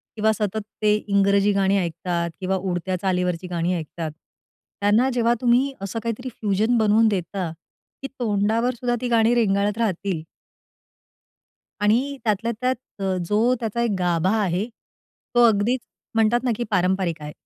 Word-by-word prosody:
किंवा 220 0 +2
सतत 215 0 -2 0.2
ते 210 0 +4
इंग्रजी 200 -1 +2
गाणी 195 0 +2
ऐकतात 170 -1 -2
किंवा 190 0 -1
उडत्या 185 0 -2
चालीवरची 180 -2 -1
गाणी 175 0 -1
ऐकतात, 160 0 -5 0.7
त्यांना 215 +6 +3
जेव्हा 235 -1 +2
तुम्ही 255 +3 +3
असं 200 +3 -3
काहीतरी 230 +3 -3
फ्युजन 220 +1 0
बनवून 220 +1 +4
देता, 185 -3 -2 0.5
की 270 - -4
तोंडावर 225 +2 +1
सुद्धा 240 0 -1
ती 250 - -1
गाणी 230 -1 +3
रेंगाळत 205 -2 +1
राहतील. 195 -6 -1 1.6
आणि 250 +7 +2
त्यातल्या 225 +1 0
त्यात 255 +1 +1 0.3
अ, 190 -1 0
जो 220 +7 +2
त्याचा 230 0 -2
एक 235 - +1
गाभा 180 +3 +1
आहे, 190 +1 0 0.7
तो 240 - +6
अगदीच 225 +4 +2 0.4
म्हणतात 225 +2 +3
ना, 250 - +1
की 240 - -1
पारंपरिक 180 -3 +1
आहे. 150 0 -6
205 Hz, 145 wpm, -23 LUFS, 185-230 Hz, 1.6 s, तो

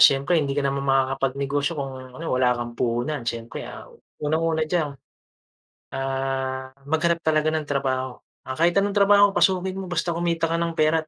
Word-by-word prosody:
siyempre 140 +5 +5
hindi 140 -1 -2
ka 145 - +1
naman 140 0 0
makakapagnegosyo 135 +3 0
kung, 135 -2 -3 0.2
ano, 165 - -7
wala 125 -1 +3
kang 120 0 -4
puhunan. 120 +2 -1
Siyempre, 115 0 -5
ah, - - -10 0.3
unang-una 160 +1 +1
diyan, 155 -2 0 1.1
ah, 135 0 -2
maghanap 165 +3 +1
talaga 155 -1 +2
ng 155 - -1
trabaho. 130 -3 -2 0.2
Ah, 130 +2 -6
kahit 170 +1 +3
anong 200 +1 +2
trabaho 200 0 +6
pasukin 190 -1 +2
mo 190 - -5
basta 175 0 -1
kumita 165 -1 0
ka 165 - +1
ng 170 -1 -1
pera 155 0 +2
145 Hz, 165 wpm, -24 LUFS, 135-170 Hz, 1.1 s, trabaho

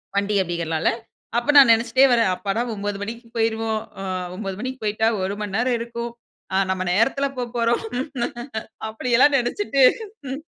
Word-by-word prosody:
வண்டி 200 +1 +1
அப்டிங்கிறனால 170 -3 -2 0.5
அப்ப 240 +5 +2
நான் 275 -4 +9
நெனைச்சுட்டே 230 +3 +4
வர்றேன், 230 -5 +4
அப்பாடா 200 +4 -2
9 205 -1 -3
மணிக்கு 230 +3 -6
போய்ருவோம். 225 -1 0 0.2
ஆ - - -5 0.3
9 195 -1 -5
மணிக்கு 260 +2 -5
போய்ட்டா 215 +1 +1
1 190 +1 -1
மணி 205 -2 -4
நேரம் 245 +2 +1
இருக்கும். 235 0 -5 0.4
ஆ - - +1
நம்ம 190 0 -1
நேரத்தில 270 +8 +2
போப்போறோம் 240 -1 0 1.1
அப்டியெல்லாம் 250 +5 +3
நெனைச்சுட்டு. 275 +4 0 0.5
ம். 270 +2 -4
230 Hz, 140 wpm, -22 LUFS, 205-245 Hz, 1.1 s, நான்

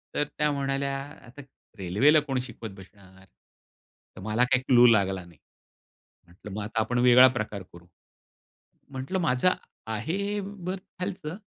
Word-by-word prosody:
तर - - +2
त्या 150 0 +2
म्हणाल्या, 140 0 -1 0.3
"आता 125 +4 -12 0.4
रेल्वेला 105 - +4
कोण 135 -3 -2
शिकवत 115 -3 -9
बसणार?" 95 0 -16 0.9
तर - - -10
मला 110 +4 +1
काही 125 0 +2
क्लू 125 -2 +6
लागला 95 -5 +2
नाही. 85 -2 -18 0.9
म्हटलं 90 +4 -13
मग 105 +1 -4
आता 110 +2 -3
आपण 120 +3 -1
वेगळा 125 +1 +8
प्रकार 105 -3 -4
करू. 85 0 -14 1.1
म्हटलं, 135 +8 -3
"माझं 165 +2 +2 0.3
आहे 185 - -2
बर्थ 190 -1 -6 0.2
खालचं, 180 -3 -5
125 Hz, 135 wpm, -27 LUFS, 105-150 Hz, 1.1 s, वेगळा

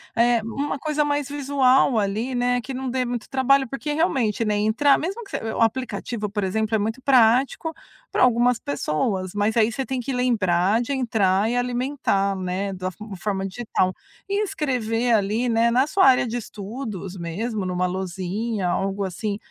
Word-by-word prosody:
eh, 235 0 +3
uma 275 +6 -3
coisa 300 +1 0
mais 290 -1 -1
visual 270 -3 +3
ali, 215 +5 -1
né, 245 0 +1
que 270 - -8
não 260 0 -3
dê 255 +1 0
muito 245 -2 -4
trabalho. 265 0 +3
Porque 275 +4 -4
realmente, 255 - +1
né, 210 -1 +1
entrar 220 +7 +3
mesmo 390 +9 -4
que 395 - -15
você - - -3
o - - -2
aplicativo, 230 -2 -1
por 205 -1 -2
exemplo, 220 +3 0
é - - +4
muito 220 +4 -2
prático 260 +5 +3 0.4
para - - 0
algumas 245 -1 +3
pessoas. 185 - -2
Mas 205 +2 0
aí 225 0 +4
você 265 +3 -3
tem 260 -2 -3
que 270 +3 -4
lembrar, 215 -4 +2
de 275 +4 -2
entrar 215 -5 +1
e 245 - -1
alimentar, 245 -5 0
né, 190 +1 -3
da 185 0 -4
fo 210 +3 -9
forma 195 +1 -2
digital 190 -2 -1 0.4
e 405 +2 +1
escrever 245 - 0
ali, 215 +3 +1
né, 230 +1 +3
na 255 +4 +3
sua 385 +4 +3
área 255 -2 +5
de 235 +2 -3
estudos, 205 -3 -6
mesmo 200 +5 -3
numa 180 0 0
lousinha, 190 +3 -3
algo 195 +3 -1
assim 200 +2 -3
230 Hz, 180 wpm, -23 LUFS, 200-260 Hz, 0.4 s, área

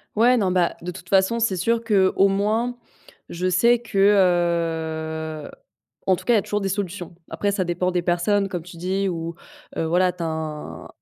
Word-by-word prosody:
Ouais, 240 +4 +5
non, 195 -5 +1
bah, 180 -2 +1
de 175 +1 -5
toute 180 - -12
façon, 195 +4 +3
c'est 220 -5 +1
sûr 230 +6 0
qu'au 195 -3 +3
moins, 215 +5 0 0.5
je 180 +2 -2
sais 235 +7 +4
que, 235 -4 -7 1.5
heu, - - -11 0.6
en 190 - +5
tout - - -11
cas 240 - +3
il - - +5
y - - +4
a - - -2
toujours 205 +1 -2
des 195 - -1
solutions. 185 -2 -4 0.2
Après 205 - -1
ça 195 -2 0
dépend 180 +1 -1
des 175 -1 0
personnes, 180 +4 +1
comme 180 -3 -5
tu 170 0 -12
dis 190 +3 -1
ou, 165 -1 -4 0.4
heu, - - 0
voilà 180 +3 +2
tu 175 -1 -6
as - - -1
un 155 - -5
185 Hz, 200 wpm, -23 LUFS, 175-205 Hz, 1.5 s, Ouais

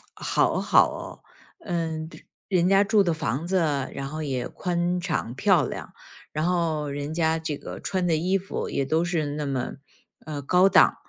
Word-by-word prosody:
好 - - +1
好 - - +5
哦。 - - -8 0.4
嗯， 160 -3 -3 0.4
人 180 -3 +2
家 195 +1 +5
住 205 0 +4
的 170 -3 +1
房 150 0 -2
子， 190 +2 +1 0.4
然 135 - -4
后 155 +2 -5
也 130 -4 -2
宽 175 0 -1
敞 170 -9 -2
漂 170 -4 +3
亮， - - -7 0.4
然 155 - -2
后 165 -4 0
人 145 +2 -4
家 160 -1 +2
这 160 -2 -3
个 - - -8
穿 185 -2 -1
的 165 - +3
衣 180 +5 +1
服， 195 +1 -4
也 140 - 0
都 160 +4 +1
是 170 -3 0
那 145 +1 -3
么， 135 -3 -2 0.5
呃， 150 -2 -5
高 180 +7 +4
档， - - +6
160 Hz, 190 characters per minute, -25 LUFS, 150-180 Hz, 0.5 s, 档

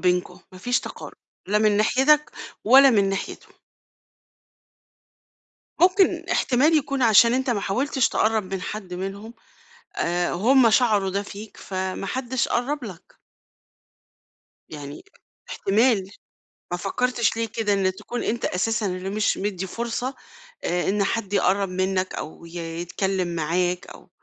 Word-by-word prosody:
بينكم، 180 0 0
ما 185 - -11
فيش 245 +6 0
تقارب، - - -9 0.3
لا 210 +1 +3
من 215 -1 +3
ناحيتك 270 +8 +3 0.3
ولا 270 +4 +8
من 200 -4 +3
ناحيتهُم. 195 0 -5 2.3
ممكن 370 +2 +4
إحتمال 295 +5 +3
يكون 275 -2 -2
علشان 230 +1 +6
أنت 260 0 0
ما 220 -4 0
حاولتش 255 +6 0
تقرّب 215 -3 0
من 190 - -4
حد 195 -4 -6
منهم 195 +5 -6 0.6
آآ، 175 +1 0
هم 240 +6 +4
شَعروا 215 -4 +3
ده 200 +2 -2
فيك، 205 +1 -10
فما 190 0 -4
حدش 255 +3 -1
قرّب 270 +4 -1
لَك. 190 -7 -11 1.5
يعني 145 -2 -9 0.5
إحتمال، 205 -1 +1 0.6
ما 175 - -1
فكّرتش 235 +4 0
ليه 230 0 -1
كده 215 -2 0
إنك 190 -1 +1
تكون 245 - -5
أنت 235 +1 -2
أساسًا 225 +4 0
اللي 185 0 -3
مش 210 +1 0
مدّي 190 -2 -3
فُرصة 240 +5 -4 0.5
آآ، 175 +1 0
إن 200 +1 +1
حد 205 -1 -2
يقرّب 195 0 +2
منَّك 185 0 -1
أو 160 - -8
ي 170 +1 -12 0.3
يتكلّم 190 +1 -2
معاك 175 +3 -1
أو - - -14
205 Hz, 135 wpm, -24 LUFS, 185-240 Hz, 2.3 s, ولا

